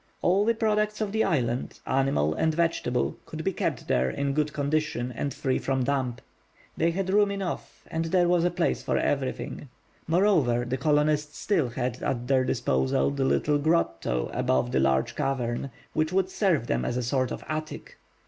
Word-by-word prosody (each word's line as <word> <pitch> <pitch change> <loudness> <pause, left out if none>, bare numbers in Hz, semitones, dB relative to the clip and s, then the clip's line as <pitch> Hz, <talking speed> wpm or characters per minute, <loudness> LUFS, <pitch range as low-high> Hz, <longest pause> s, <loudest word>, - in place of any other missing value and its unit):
All 195 +3 +3
the 230 +1 +2
products 215 -1 +1
of 215 -2 -1
the 220 +1 +2
island, 125 -8 -1
animal 130 - +1
and 160 - 0
vegetable, 165 -7 0
could 160 0 -6
be 195 - 0
kept - - -2
there 65 +1 +2
in 140 - -1
good 150 +1 0
condition 145 -4 -1
and 140 +4 -2
free 135 -2 -1
from 135 -1 0
damp. 130 -2 -1 0.5
They 165 - +2
had 190 +2 -2
room 205 0 +4
enough, 195 -3 -5
and 165 0 -2
there 175 +1 +3
was 175 -1 +3
a 175 - +3
place 175 -1 0
for - - 0
everything. 135 0 -2 0.4
Moreover, 160 - +3
the 125 +2 -1
colonists 150 0 +1
still 160 -11 +1
had 125 0 -3
at 120 -2 -2
their 130 -1 +3
disposal 65 - +1
the 70 - -1
little 110 - +2
grotto 85 - 0
above 65 -1 +1
the 65 - +2
large 65 0 +1
cavern, 130 -1 -1 0.2
which 155 +1 0
would 190 0 +1
serve 180 - +1
them 60 - 0
as 120 - -1
a 125 - -1
sort 130 +1 0
of - - -6
attic. 155 0 -5
145 Hz, 180 wpm, -27 LUFS, 120-170 Hz, 0.5 s, room